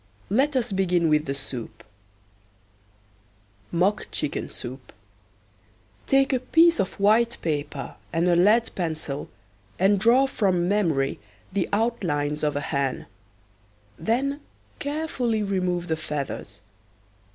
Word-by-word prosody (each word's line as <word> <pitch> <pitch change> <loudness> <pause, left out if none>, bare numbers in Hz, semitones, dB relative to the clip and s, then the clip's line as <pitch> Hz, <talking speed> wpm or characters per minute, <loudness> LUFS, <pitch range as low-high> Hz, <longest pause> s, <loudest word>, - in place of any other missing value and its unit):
Let 275 +7 +2
us 245 -3 0
begin 180 -3 +2
with 150 0 +3
the 135 - -1
soup: 125 -5 -5 1.9
MOCK 190 +5 +1
CHICKEN - - -2
SOUP. - - -5 1.2
Take 270 0 +3
a 255 - +2
piece 330 +4 +4
of 195 0 -2
white 225 +4 +3
paper 145 -3 -3 0.2
and 170 +1 +1
a 175 - +4
lead 210 +7 +4
pencil 155 -5 -3 0.5
and 195 +2 +3
draw 240 +6 +5
from 185 -9 +1
memory 165 -9 +1 0.3
the 195 -2 0
outlines 160 -10 0
of 150 -1 +1
a 145 - -1
hen. 140 -2 -2 0.9
Then 275 +6 0 0.4
carefully 285 -7 -1
remove 180 -3 -1
the 160 -2 -1
feathers. 140 -10 -5
185 Hz, 115 wpm, -25 LUFS, 155-235 Hz, 1.9 s, draw